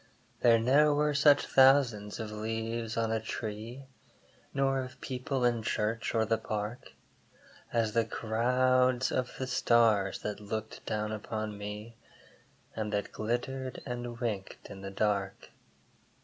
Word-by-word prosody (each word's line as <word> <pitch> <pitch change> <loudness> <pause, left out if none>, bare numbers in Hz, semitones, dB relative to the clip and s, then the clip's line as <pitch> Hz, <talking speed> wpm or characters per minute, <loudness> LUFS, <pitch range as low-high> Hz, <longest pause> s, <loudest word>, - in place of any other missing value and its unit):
There 115 -1 +6
ne'er 145 +6 +4
were 150 0 +2
such 145 0 +5
thousands 130 -7 +4
of 110 -1 -5
leaves 115 +1 -3
on 115 -1 +1
a 110 - +1
tree, 110 +3 -6 0.7
Nor 135 -1 +1
of 130 -1 -9
people 130 0 -2
in 120 -2 +2
church 110 +1 -1
or 110 -1 +3
the 115 +1 +1
Park, 110 +2 -5 0.8
As 115 -2 +1
the 115 - +3
crowds 125 +3 +2
of 125 -1 -2
the 130 - -2
stars 115 -6 +3
that 105 -1 -3
looked 110 +1 -5
down 105 0 -1
upon 110 0 -4
me, 105 +3 -7 0.8
And 110 -1 -3
that 105 -1 -2
glittered 125 +4 -3
and 120 -2 -5
winked 105 -6 -4
in 95 -1 -9
the 100 - -5
dark. 100 -1 -1
115 Hz, 135 wpm, -30 LUFS, 105-125 Hz, 0.8 s, There